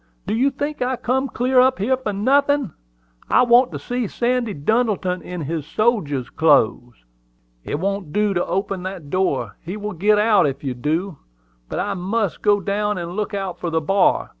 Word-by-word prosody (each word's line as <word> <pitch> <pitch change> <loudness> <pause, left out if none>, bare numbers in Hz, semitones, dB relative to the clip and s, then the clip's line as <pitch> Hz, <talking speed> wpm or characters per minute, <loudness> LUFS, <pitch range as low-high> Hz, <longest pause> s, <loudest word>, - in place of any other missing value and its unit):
"Do - - -2
you 255 +5 +3
think 290 +2 -4
I 255 +1 0
come 260 +3 -1
clear 255 +1 +1
up 260 +1 +4
here 230 +7 +1
for 255 -5 -4
nothin'? 275 - +2 0.6
I - - +5
want 245 +1 +5
to - - -4
see 245 -2 -3
Sandy 240 -1 -1
Duddleton 190 +1 0
in 180 +1 -6
his 155 +1 -3
sodjer's 155 - 0
clothes." 120 - +2 0.6
"It 145 - -3
won't 195 -3 -2
do 210 +3 +1
to 175 - 0
open 195 -1 -2
that 180 -6 -7
door: 140 - -1
he 180 +5 -5
will 210 0 -5
git 205 +5 +3
out 210 -5 +4
if 135 0 -5
you 135 -2 -2
do. 155 +7 -2 0.5
But - - -4
I 205 - -1
must 195 +1 -2
go 205 -1 +3
down 205 +1 -1
and 170 -1 -5
look 210 0 -2
out 190 -3 -4
for 175 - -3
the 165 0 +1
bar. 190 +5 +2
200 Hz, 190 wpm, -21 LUFS, 170-235 Hz, 0.6 s, I